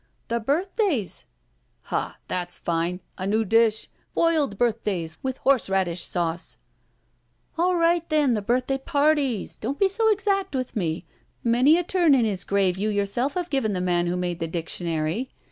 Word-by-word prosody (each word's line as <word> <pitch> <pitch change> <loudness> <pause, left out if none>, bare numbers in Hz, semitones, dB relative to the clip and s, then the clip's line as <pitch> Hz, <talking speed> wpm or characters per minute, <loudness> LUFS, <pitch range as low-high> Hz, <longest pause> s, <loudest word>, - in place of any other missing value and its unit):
•'The 235 -1 -1
birthdays." 330 - 0 0.6
*'Ha! - - -3
That's 180 -1 -2
fine! 170 +2 -1 0.2
A 185 - -2
new 220 +2 +1
dish. 225 +1 +3 0.3
Boiled 310 -10 +2
birth 230 -1 +1
days 170 -6 -3
with 260 -1 -3
horseradish 195 -9 +1
sauce." 170 -1 -3 1.0
A11 360 +1 +3
right, 335 0 +2
then, 300 -5 +3
the 215 - 0
birthday 255 +5 0
parties. 285 -4 +1
Don't 265 +6 -3
be 395 - +4
so 445 +3 +2
exactly 390 -5 0
with 255 -1 -4
me. 165 -6 -2 0.4
Many 250 +7 +5
a 355 - 0
turn 345 -4 +3
in 245 -3 +3
his 200 -4 -1
grave 190 -2 +1
you 215 +2 0
yourself 210 +7 0
have 355 -2 -3
given 265 -7 +1
the 185 - -1
man 175 -1 +1
who 175 +1 -1
made 175 -1 -2
the 165 - -2
dic 165 0 -3
tionary. 165 +7 -2
230 Hz, 165 wpm, -25 LUFS, 180-295 Hz, 1.0 s, Many